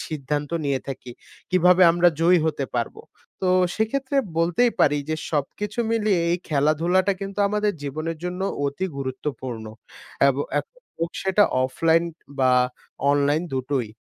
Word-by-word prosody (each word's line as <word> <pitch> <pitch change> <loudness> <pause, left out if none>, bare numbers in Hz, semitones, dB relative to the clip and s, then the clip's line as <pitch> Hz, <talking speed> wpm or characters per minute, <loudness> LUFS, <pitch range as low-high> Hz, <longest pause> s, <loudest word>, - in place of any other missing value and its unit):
সিদ্ধান্ত 145 -1 -3
নিয়ে 140 -2 0
থাকি। 130 -2 -6 0.4
কীভাবে 180 0 +5
আমরা 175 +1 +5
জয়ী 175 +2 +5
হতে 145 -3 -1
পারবো? 120 -1 -3 0.4
তো 185 - 0 0.3
সেক্ষেত্রে 265 +5 -1 0.2
বলতেই 175 +9 +3
পারি 145 0 +4
যে 155 - 0
সবকিছু 200 - -3
মিলিয়ে 215 -5 +2
এই 175 - +2
খেলাধুলাটা 165 +6 +2
কিন্তু 195 +1 -6
আমাদের 210 0 0
জীবনের 155 +4 -4
জন্য 180 +1 -4 0.2
অতি 140 +7 -2
গুরুত্বপূর্ণ। 130 -3 -5 0.6
এব 135 - +1 0.2
এক - - -2 0.4
হোক 165 0 -1
সেটা 195 +2 +4 0.2
অফলাইন 165 +5 +2 0.3
বা 130 -1 +4 0.6
অনলাইন 145 +3 +2
দুটোই। 130 -2 -1
165 Hz, 135 wpm, -23 LUFS, 140-185 Hz, 0.6 s, কীভাবে